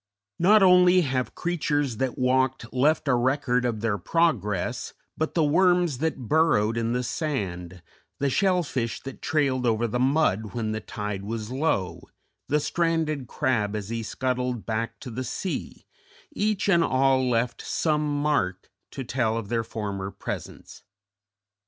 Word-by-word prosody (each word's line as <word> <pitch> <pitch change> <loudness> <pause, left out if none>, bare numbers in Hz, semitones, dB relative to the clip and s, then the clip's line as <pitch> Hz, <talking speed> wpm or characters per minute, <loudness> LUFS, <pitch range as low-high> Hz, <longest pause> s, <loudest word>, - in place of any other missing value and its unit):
Not 205 +4 +6
only 180 0 +6
have 130 -5 -2
creatures 145 -7 -1
that 130 0 -2
walked 130 -1 +1
left 145 +4 +2
a 135 - +4
record 125 0 +1
of 115 -3 -1
their 110 -3 0
progress, 105 - 0 0.2
but 160 - -2
the 165 - +3
worms 175 -2 +3
that 140 -6 -2
burrowed 130 -9 +3
in 115 0 -1
the 125 0 0
sand, 95 - -4 0.3
the 140 - 0
shell 180 +5 +2
fish 120 -6 -3
that 135 -1 -8
trailed 140 -4 +1
over 115 0 +1
the 120 +2 -1
mud 125 -7 +1
when 110 -2 -1
the 110 - -2
tide 105 -2 -5
was 110 +2 -5
low, 130 - -1 0.5
the 150 - +2
stranded 160 -4 0
crab 115 -8 0
as 105 -1 -4
he 115 0 -2
scuttled 125 0 -2
back 115 0 -3
to 125 - -7
the 130 +3 -4
sea 180 +8 -5 0.5
each 215 -8 0
and 170 -4 +4
all 130 -2 +2
left 120 0 0
some 150 -2 0
mark 95 -13 0 0.2
to 135 - -6
tell 120 -3 0
of 110 -3 -5
their 115 -1 0
former 100 -3 -4
presence. - - -7
130 Hz, 150 wpm, -26 LUFS, 115-155 Hz, 0.5 s, Not